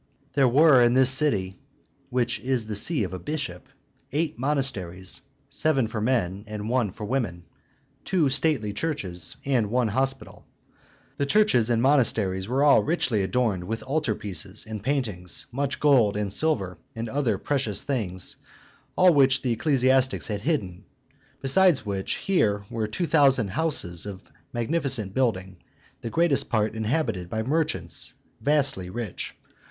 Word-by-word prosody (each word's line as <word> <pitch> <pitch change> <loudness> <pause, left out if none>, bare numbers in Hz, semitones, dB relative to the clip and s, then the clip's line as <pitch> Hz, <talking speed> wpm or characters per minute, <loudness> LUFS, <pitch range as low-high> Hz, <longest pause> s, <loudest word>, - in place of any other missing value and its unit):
There 135 -2 +4
were 140 +1 +6
in 120 0 +4
this 130 -1 +7
city 100 - +2 0.5
(which 125 -1 0
is 125 -3 -1
the 110 -1 -5
see 140 - 0
of 95 - -5
a 95 - -5
bishop) 90 - -5 0.4
eight 155 -1 -2
monasteries, 105 - -2 0.3
seven 140 -6 +1
for 110 -1 -4
men, 105 -5 0
and 105 0 -5
one 120 -5 +1
for 105 +2 -7
women; 105 -8 -2 0.6
two 180 -6 +1
stately 135 -6 +1
churches, 100 - -2
and 125 -7 +1
one 120 0 +1
hospital. 135 +4 -2 0.7
The 140 - -1
churches 140 - +3
and 115 0 +1
monasteries 110 -9 +2
were 130 +4 +1
all 145 -1 +6
richly 130 -9 0
adorned 100 -3 0
with 115 +4 -4
altar 140 -5 -1
pieces 100 +1 -4
and 110 -1 -6
paintings, 105 -9 -2
much 135 +2 -2
gold 125 -9 +4
and 100 -2 -2
silver, 100 - 0 0.2
and 115 +1 -4
other 120 -4 0
precious 115 -6 0
things, 95 -10 -3 0.6
all 185 -1 +6
which 135 -2 +4
the 125 - 0
ecclesiastics 130 +1 +2
had 105 -3 -3
hidden. 105 - -2 0.6
Besides 145 -1 +4
which, 100 -2 -2
here 105 - 0
were 110 -2 -2
two 110 +12 -2
thousand 135 -9 +3
houses 105 - -1
of 100 -1 -8 0.3
magnificent 120 - -1
building, 95 -8 -1 0.4
the 115 - -4
greatest 165 0 +2
part 110 -2 0
inhabited 110 - -2
by 110 +3 -2
merchants 155 +6 -2 0.3
vastly 140 -11 +1
rich. 110 -1 -5
120 Hz, 145 wpm, -25 LUFS, 100-140 Hz, 0.7 s, this